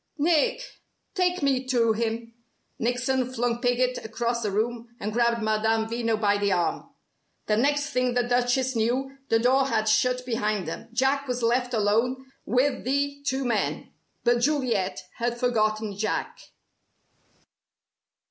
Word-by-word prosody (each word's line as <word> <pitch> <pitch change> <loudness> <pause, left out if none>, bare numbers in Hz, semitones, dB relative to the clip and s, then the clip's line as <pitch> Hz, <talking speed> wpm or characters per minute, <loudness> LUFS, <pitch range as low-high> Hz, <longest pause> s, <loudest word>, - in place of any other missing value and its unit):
Nick, 350 +12 +1 0.3
take 360 -3 0
me 265 -2 +2
to 235 -3 +3
him!" 230 +1 -3 0.5
Nickson 250 +2 0
flung 240 -1 -1
Piggott 250 0 +1
across 235 +2 -2
the 215 - -1
room, 230 +3 -2
and 210 +1 -3
grabbed 235 -1 +2
Madame 220 +1 +1
Veno 230 -1 -1
by 205 -1 +2
the 200 -1 +1
arm. 175 -2 -1 0.6
The 210 - +2
next 285 +5 +1
thing 250 -1 0
the 245 - +3
Duchess 245 +1 +1
knew, 255 +4 0
the 225 - +4
door 260 +3 +3
had 220 -4 0
shut 250 +3 +2
behind 215 -6 -1
them. 225 +7 -6
Jack 270 +3 +1
was 250 -1 -2
left 245 +1 +1
alone 230 +5 +1 0.2
with 260 +3 +1
the 280 +2 -1
two 265 0 0
men. 230 -4 -1 0.3
But 240 0 +3
Juliet 240 -10 0
had 240 0 -2
forgotten 215 -4 0
Jack. 215 +2 -2
240 Hz, 140 wpm, -26 LUFS, 220-260 Hz, 0.6 s, the